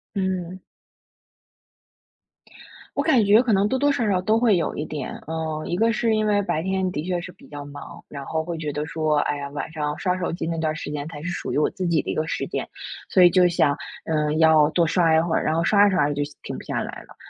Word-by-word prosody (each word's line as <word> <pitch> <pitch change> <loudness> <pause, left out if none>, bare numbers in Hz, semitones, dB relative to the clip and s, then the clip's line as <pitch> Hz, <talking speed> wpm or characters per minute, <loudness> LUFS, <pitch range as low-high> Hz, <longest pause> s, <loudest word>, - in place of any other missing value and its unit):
嗯。 185 -2 -2 2.4
我 285 - +2
感 270 -8 +4
觉 210 +4 +5
可 235 -4 +1
能 195 +1 +3
多 260 - +1
多 285 +2 +3
少 245 -5 0
少 190 -2 +2
都 215 +5 +2
会 225 -5 +4
有 170 - -2
一 150 - -3
点。 150 -4 -5 0.2
嗯， 160 -1 -3
一 - - -1
个 225 +2 +3
是 225 0 +1
因 215 0 +1
为 205 -1 +2
白 175 -5 -1
天 190 0 -1
的 150 -3 -3
确 175 0 -2
是 180 - -8
比 - - -18
较 145 -1 -8
忙， 145 0 -10
然 140 -1 -7
后 160 +2 -2
会 170 0 -5
觉 150 -2 -4
得 150 +1 -3
说， 155 -2 0
哎 145 0 0
呀， 140 0 -5
晚 145 +2 -5
上 150 -2 -2
刷 180 -1 0
手 180 - -2
机 170 - -4
那 165 0 -2
段 155 -1 -1
时 155 - -6
间 145 0 -4
才 150 -3 -8
是 175 - -4
属 175 - -4
于 - - +2
我 150 - +2
自 185 - -5
己 165 -3 +2
的 - - -7
一 - - -1
个 155 - 0
时 165 - -3
间， - - -4 0.4
所 185 - +3
以 175 - +9
就 180 +1 +4
想， 155 -4 +2 0.3
嗯， 155 -1 0
要 160 -2 +6
多 170 0 +2
刷 165 -1 +3
一 - - +5
会， 165 0 +1
然 - - +1
后 165 +1 +1
刷 205 +3 +5
着 195 - +1
刷 145 -4 +3
着 145 - -1
就 145 - 0 0.2
停 - - -6
不 - - -9
下 - - -3
来 - - -7
了。 - - -17
165 Hz, 280 characters per minute, -23 LUFS, 155-190 Hz, 2.4 s, 以